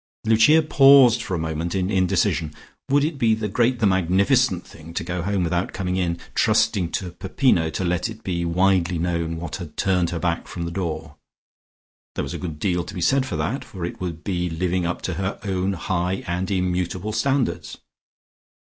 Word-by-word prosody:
Lucia 115 +9 +5
paused 135 -5 +6
for 95 - -3
a - - -1
moment 80 +2 -3
in 95 +1 0
indecision. 90 -4 +1 0.4
Would 140 +1 +3
it 155 -2 -2
be 115 -3 +3
the 110 -1 -3
great, 120 +5 +1
the 115 - +1
magnificent 95 +3 +2
thing 80 +1 -13
to - - -1
go 90 +1 -3
home 95 +1 0
without 85 +1 -1
coming 90 -1 -2
in, 85 -2 0 0.2
trusting 110 -5 +2
to 90 -2 -3
Peppino 95 - +1
to 95 - -3
let 90 +4 0
it 110 0 -10
be 85 -2 -2
widely 90 0 +2
known 85 -1 -2
what 80 -2 -5
had 85 -5 -9
turned 90 -3 +1
her 85 - -3
back 85 0 -2
from 85 - -5
the 85 - -4
door? 80 -4 -4 1.0
There - - -1
was 70 - -5
a - - -5
good 80 -5 -5
deal 90 +1 0
to - - -9
be - - -4
said 135 +8 +2
for - - -4
that, 135 - -2
for 90 -3 -6
it 85 - -7
would 85 -3 -5
be 90 -3 -1
living 90 +1 -1
up 90 - -4
to 90 - -2
her 95 +1 -3
own 95 -1 -1
high 90 +1 -2
and 90 +2 -2
immutable 90 +1 -1
standards. 120 - -1
90 Hz, 195 wpm, -23 LUFS, 85-105 Hz, 1.0 s, paused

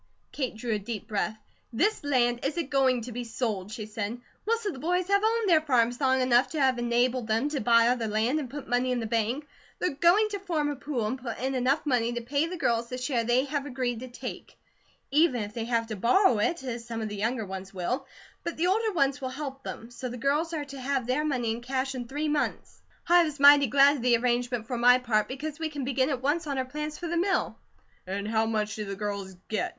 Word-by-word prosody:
Kate 260 -5 -3
drew 225 +1 -2
a 210 - 0
deep 215 0 -6
breath. 215 0 -1 0.3
"THIS 410 - +1
land 245 -4 +2
isn't 295 +1 -2
going 260 -3 +3
to 245 - -7
be 245 +1 -4
sold," 220 -4 -3
she 215 -1 -5
said. 215 +2 -4 0.3
"Most 460 0 0
of 405 - -1
the 265 - -9
boys 360 +4 0
have 400 0 +4
owned 450 0 +2
their 330 -4 +5
farms 245 -4 +1
long 260 -1 +3
enough 255 0 +4
to 315 - -3
have 260 -3 +3
enabled 240 0 +1
them 225 +6 +1
to 290 -2 -2
buy 230 +1 +5
other 240 -2 +1
land, 220 +7 +1
and 270 -5 -5
put 285 +1 -7
money 245 +1 +1
in 250 - 0
the 225 - -3
bank. 230 +5 -1 0.3
They're 360 - 0
going 350 +9 +4
to 405 -1 -4
form 320 -6 -1
a - - -4
pool, 265 -4 -3
and 255 +5 -2
put 240 -2 -5
in 265 +2 -2
enough 265 +4 +1
money 240 -4 +1
to 240 - -3
pay 280 +6 0
the 360 +1 -5
girls 235 -6 0
the 250 - -4
share 250 -2 0
they 240 +3 +2
have 285 0 -3
agreed 245 -3 -2
to 255 - -7
take; 245 - -8 0.5
even 285 -6 +3
if 205 +1 -7
they 230 0 -3
have 230 -1 0
to 220 -1 -5
borrow 240 - +4
it, 335 +7 0
as 240 -3 -4
some 230 -1 -5
of 215 - -3
the 210 - -5
younger 225 +2 -1
ones 190 0 -7
will; 245 +9 -3 0.4
but 340 - -4
the 330 - +1
older 430 +4 +1
ones 275 -3 +1
will 260 - -2
help 270 0 -6
them; 230 -2 -8
so 250 +1 -5
the 245 - -6
girls 290 +6 0
are 305 -3 -3
to 275 -1 -9
have 265 -1 -1
their 255 +5 0
money 250 -7 0
in 230 +2 -4
cash, 265 +2 -2
in 245 -2 -5
three 295 +4 -2
months. 295 0 -2 0.3
I 350 0 +6
was 305 -3 -4
mighty 285 0 +8
glad 280 +4 +5
of - - -6
the 240 -1 +4
arrangement 240 -1 0
for 245 +1 -3
my 245 +1 +7
part, 235 -4 +1
because 295 +4 -5
we 320 -1 -2
can 290 -4 -5
begin 265 +1 +1
at 260 -3 -2
once 305 +4 0
on 280 -2 -2
our 260 - 0
plans 300 +3 -5
for 350 - -6
the 340 +1 -1
mill." 380 +3 0 0.5
"And 200 +2 -3
how 220 0 +1
much 215 -1 -1
do 210 - -3
the 195 0 -5
girls 200 -2 -4
get?" 215 -3 -1
255 Hz, 250 wpm, -28 LUFS, 230-290 Hz, 0.5 s, mighty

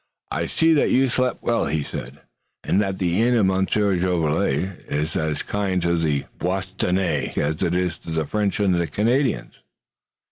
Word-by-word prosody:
"I - - -1
see 165 0 +3
that 150 - +3
you've 130 -1 +3
slept 130 -1 0
well," 120 - +1
he 75 -1 -1
said, - - -7 0.4
"and 100 - +2
that 95 -2 -2
the 90 +2 +1
inn 120 +1 +3
of 110 -4 +4
Monsieur 95 +1 +2
Jolivet 90 0 0
is 75 +2 -2
as 80 -1 -1
kind 100 -2 -1
to 85 0 +2
the 75 -4 0
Bostonnais 95 -3 -1
as 75 +2 0
it 85 - +1
is 90 -2 -1
to - - -11
the 80 -1 -1
French 105 +4 -1
and 100 -3 +3
the 85 -1 +1
Canadians." 115 - 0
95 Hz, 175 wpm, -23 LUFS, 80-105 Hz, 0.4 s, of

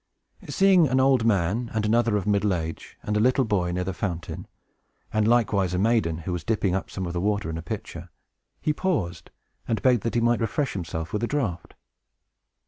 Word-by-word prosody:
Seeing 190 -4 +5
an 130 0 +2
old 130 -3 +3
man, 105 +3 +1
and 110 -1 0
another 115 0 +2
of 95 - -3
middle 100 -2 +2
age, 80 -1 -6
and 105 - -2
a - - +2
little 130 +3 +3
boy, 90 -5 0
near 90 +1 -1
the 95 +1 -3
fountain, 85 -4 -4 0.7
and 110 0 +2
likewise 100 -6 +2
a - - 0
maiden, 105 -5 +2
who 90 +2 -4
was 85 -3 -4
dipping 105 -4 0
up 95 - -2
some 95 - -4
of 85 - -4
the 85 - -2
water 100 -3 0
in 80 - -4
a - - -5
pitcher, 85 - -7 0.5
he 150 - +2
paused, 145 - -2 0.4
and 110 -3 -1
begged 125 -4 +4
that 115 - -3
he - - +4
might 120 0 +2
refresh 135 +5 -1
himself 80 -3 -5
with 105 - -1
a - - +1
draught. 115 - -3
105 Hz, 205 wpm, -25 LUFS, 90-120 Hz, 0.7 s, Seeing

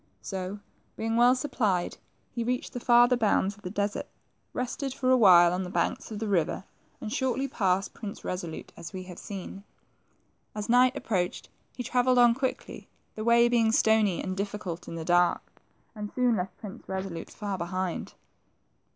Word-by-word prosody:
So, 190 +1 -4 0.4
being 225 +1 -1
well 245 +2 +6
supplied, 215 -10 -1 0.3
he 235 - -3
reached 250 +2 -2
the 245 - -4
farther 240 +1 +5
bounds 205 -3 +1
of 205 - -20
the 180 - -5
desert, 205 +1 -2 0.4
rested 255 +2 -3
for 255 -1 +1
awhile 180 -8 +7
on 180 - -1
the 180 - -4
banks - - -1
of 215 - -6
the 220 +1 -3
river, 180 -3 0 0.4
and 215 - -5
shortly 260 +1 0
passed 195 -6 0
Prince 210 -3 -8
Resolute, 175 -3 -5
as 160 - -9
we 185 -1 -5
have 180 -1 -10
seen. 195 0 -7 0.9
As 210 -1 -4
night 250 +2 +5
approached, 185 -8 -2 0.3
he 250 - -3
travelled 250 +1 +2
on 240 -1 +7
quickly, 260 +1 -4 0.3
the 215 - -5
way 235 +1 +5
being 230 -2 +3
stony 220 -4 +3
and 185 0 -3
difficult 200 -3 -4
in - - -6
the 165 -1 -5
dark, 175 0 +1 0.3
and 210 -2 -6
soon 250 -2 +3
left 180 0 -4
Prince 210 +2 -9
Resolute 190 -3 -4
far 200 -3 -5
behind. 180 +1 -3
210 Hz, 170 wpm, -28 LUFS, 185-240 Hz, 0.9 s, awhile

